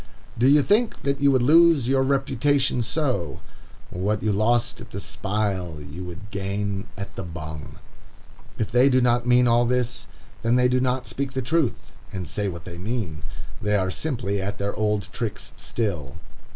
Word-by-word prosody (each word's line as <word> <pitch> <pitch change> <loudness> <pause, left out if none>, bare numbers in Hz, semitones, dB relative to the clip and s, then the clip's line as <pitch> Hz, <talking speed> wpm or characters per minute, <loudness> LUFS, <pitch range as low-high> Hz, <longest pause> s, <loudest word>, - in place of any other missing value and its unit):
Do 120 +3 +3
you 145 +1 +6
think 220 - +1
that 140 0 0
you 140 - +5
would 130 -2 +3
lose 160 -2 +6
your 135 0 +3
reputation 135 -1 +2
so? 125 - -1 0.5
What 100 +4 -1
you 110 - +2
lost 115 +3 +1
at - - -10
the - - -6
spile, 95 -5 -2
you 75 +5 -8
would 90 +4 -9
gain 100 +1 -2
at 100 0 -7
the - - -4
bung. 80 -4 -7 0.8
If 110 - -2
they 125 +4 +5
do 130 -1 +4
not 120 -1 +2
mean 125 0 +5
all 120 +1 +4
this, 125 -1 -1 0.3
then 115 +1 +2
they 125 0 +5
do 125 0 +2
not 130 0 0
speak 130 +4 -4
the 130 - -1
truth, 145 0 0 0.2
and 95 -2 -5
say 105 -2 -2
what 85 -4 -6
they 85 -1 -8
mean. 100 -6 -3 0.4
They 105 0 +1
are 95 -2 +1
simply 100 -8 -2
at 100 +2 -3
their 100 0 -2
old 105 -2 0
tricks 115 -4 -4
still. 85 - -3
115 Hz, 180 wpm, -24 LUFS, 100-130 Hz, 0.8 s, you